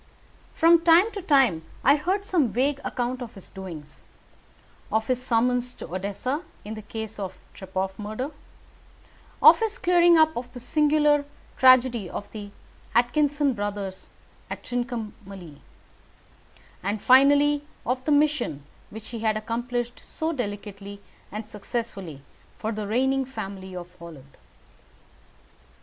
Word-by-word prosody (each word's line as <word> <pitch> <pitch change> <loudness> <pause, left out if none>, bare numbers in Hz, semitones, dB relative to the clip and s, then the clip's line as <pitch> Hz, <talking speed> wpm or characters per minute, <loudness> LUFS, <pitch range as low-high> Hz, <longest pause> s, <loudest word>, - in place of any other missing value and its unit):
From 335 +1 +6
time 345 +6 +6
to 405 - -6
time 270 - +3 0.2
I 280 - +6
heard 375 +7 -1
some 320 - +2
vague 275 +6 0
account 250 +1 -2
of 240 -2 -7
his 195 - -11
doings; 170 -6 -9 0.9
of 220 0 +1
his 250 +1 0
summons 245 0 +1
to - - -9
Odessa 205 - -2 0.2
in 215 - -5
the 215 - -7
case 220 0 -6
of 190 -2 -4 0.2
the - - -15
Trepoff 190 +1 -4
murder, 215 +7 -4 1.1
of - - +9
his 450 0 0
clearing 345 -4 +5
up 315 0 +4
of 245 +1 -5
the 250 - -7
singular 295 +2 +3 0.3
tragedy 255 -6 +5
of - - -7
the 205 -2 -7 0.5
Atkinson 285 +3 +2
brothers 205 -3 -5 0.4
at - - -6
Trincomalee, 210 - -6 1.2
and 200 +3 -2
finally 285 +4 +5 0.2
of 255 +1 -1
the 300 - 0
mission 290 - +1 0.3
which 220 +1 -9
he 235 - -6
had 215 -1 +1
accomplished 240 +2 -3
so 320 +1 -3
delicately 205 -5 -6 0.3
and 210 +1 -6
successfully 200 - -5 0.3
for 220 - -3
the 210 -2 -4
reigning 265 +5 +1
family 195 -7 -7
of 180 0 -9
Holland. 145 -5 -12
240 Hz, 130 wpm, -25 LUFS, 200-280 Hz, 1.2 s, of